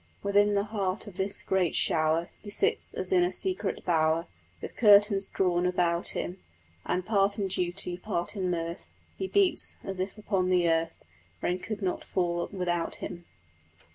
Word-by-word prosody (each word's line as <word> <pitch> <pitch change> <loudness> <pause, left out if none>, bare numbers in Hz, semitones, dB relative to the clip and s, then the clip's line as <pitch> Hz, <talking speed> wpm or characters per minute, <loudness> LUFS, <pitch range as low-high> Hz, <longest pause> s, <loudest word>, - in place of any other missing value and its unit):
Within 205 +1 +3
the 200 - +2
heart 205 -2 -2
of 200 -4 -11
this 195 +1 -2
great 185 -3 +1
shower 160 +1 +2
He 210 - -9
sits, 415 - 0
as - - -4
in 365 -1 +5
a 355 - +1
secret 365 - -2
bower, 160 -1 +2 0.3
With - - -8
curtains 205 -2 +5
drawn 180 -1 +1
about 175 -1 +1
him: 180 +2 -4 0.5
And, 180 0 -1
part 200 -1 +2
in 200 -2 -1
duty, 180 -1 +1
part 180 0 -3
in 185 -2 -1
mirth, 170 0 -3 0.3
He 380 - -3
beats, 395 -1 +1
as 195 -1 -5
if 190 +3 -3
upon 195 -3 0
the 180 -2 +3
earth 165 - 0 0.4
Rain 180 +1 0
could 210 +2 -5
not 185 - -1
fall 175 -2 -1
without 175 -3 -1
him. 175 0 -7
185 Hz, 170 wpm, -28 LUFS, 175-205 Hz, 0.5 s, in